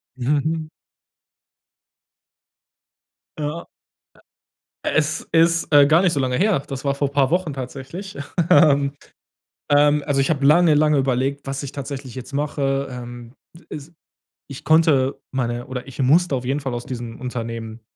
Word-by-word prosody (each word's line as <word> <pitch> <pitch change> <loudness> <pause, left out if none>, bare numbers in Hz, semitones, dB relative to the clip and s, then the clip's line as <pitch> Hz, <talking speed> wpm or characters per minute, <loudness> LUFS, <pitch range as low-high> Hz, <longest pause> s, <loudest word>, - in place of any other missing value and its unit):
Mhm. 150 +5 -1 2.7
Ja. 150 +3 -4 1.2
Es 155 0 0
ist, 165 -1 +2
äh, 145 -1 +8
gar 160 +3 +5
nicht 180 -3 +2
so 140 - 0
lange 130 -1 0
her. 205 -3 +2
Das 135 0 -6
war 140 0 +1
vor 140 0 -1
paar 140 -2 +2
Wochen 175 -4 0
tatsächlich, 135 +8 -7 0.3
ähm. 140 -6 +5 0.8
Ähm, 145 0 +4
also, 145 -2 0
ich 135 - +1
habe 145 -4 0
lange, 160 +2 +5
lange 150 0 +3
überlegt, 135 +1 0
was 135 +1 -4
ich 140 - -6
tatsächlich 135 -2 -7
jetzt 130 +1 -9
mache. 140 -1 -1
Ähm, 120 -1 -9 0.4
s 150 +2 -9 0.6
ich 140 - -9
konnte 155 -4 +3 0.2
meine 120 -2 -2
oder 130 -1 -6
ich 135 - -13
musste 150 +5 +3
auf 125 -1 -4
jeden 140 +3 -1
Fall 135 -2 -4
aus 120 0 -5
diesem 120 -2 -7
Unternehmen 115 -2 -5
140 Hz, 145 wpm, -21 LUFS, 130-150 Hz, 2.7 s, äh